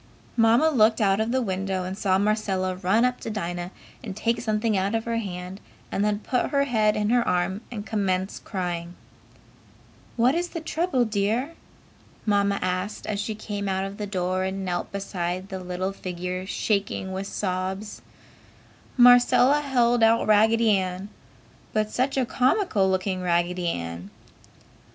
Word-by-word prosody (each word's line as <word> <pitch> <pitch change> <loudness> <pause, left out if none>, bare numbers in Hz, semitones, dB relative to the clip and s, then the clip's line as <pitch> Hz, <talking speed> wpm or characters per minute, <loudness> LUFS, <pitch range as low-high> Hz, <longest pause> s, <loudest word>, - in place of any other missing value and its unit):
Mamma 235 +7 +4
looked 220 -4 +4
out 195 -2 +3
of 220 +1 0
the 260 0 +1
window 190 -2 -2
and 185 +1 -4
saw 190 -2 +1
Marcella 195 -3 0
run 190 +6 +2
up 250 0 0
to - - -6
Dinah 175 -4 -4 0.3
and 200 -3 -6
take 230 +2 0
something 215 -1 0
out 195 +3 0
of 225 - -1
her 230 0 -1
hand 185 -2 -5 0.3
and 200 - 0
then 210 0 +1
put 245 +4 -1
her 280 -1 +2
head 220 -6 +2
in 210 +1 0
her 245 0 +4
arm 180 +3 0
and 210 -3 -6
commence 190 -3 -1
crying. 175 -3 -4 1.2
"What 245 +3 +4
is 350 +2 -1
the 335 - -5
trouble, 320 -5 0
Dear?" 220 +8 -1 0.7
Mamma 200 -1 +2
asked, 185 +3 -2
as 210 -2 -2
she 215 +1 -3
came 205 -2 -4
out 195 +1 -2
the 210 - -3
door 185 -1 -1
and 190 0 -3
knelt 175 -1 -3
beside 185 -1 -3
the 190 - -5
little 185 +1 -3
figure 180 0 -5
shaking 200 -2 -1
with 190 +1 -4
sobs. 190 +2 -3 1.0
Marcella 245 +3 +6
held 245 -4 +2
out 225 +1 +4
Raggedy 220 +1 +4
Ann. 185 +1 -3 0.6
But 215 0 0
such 265 +2 0
a 260 - +2
comical 250 - +2
looking 185 0 -1
Raggedy 175 0 0
Ann! 85 - -4
200 Hz, 155 wpm, -25 LUFS, 185-230 Hz, 1.2 s, Marcella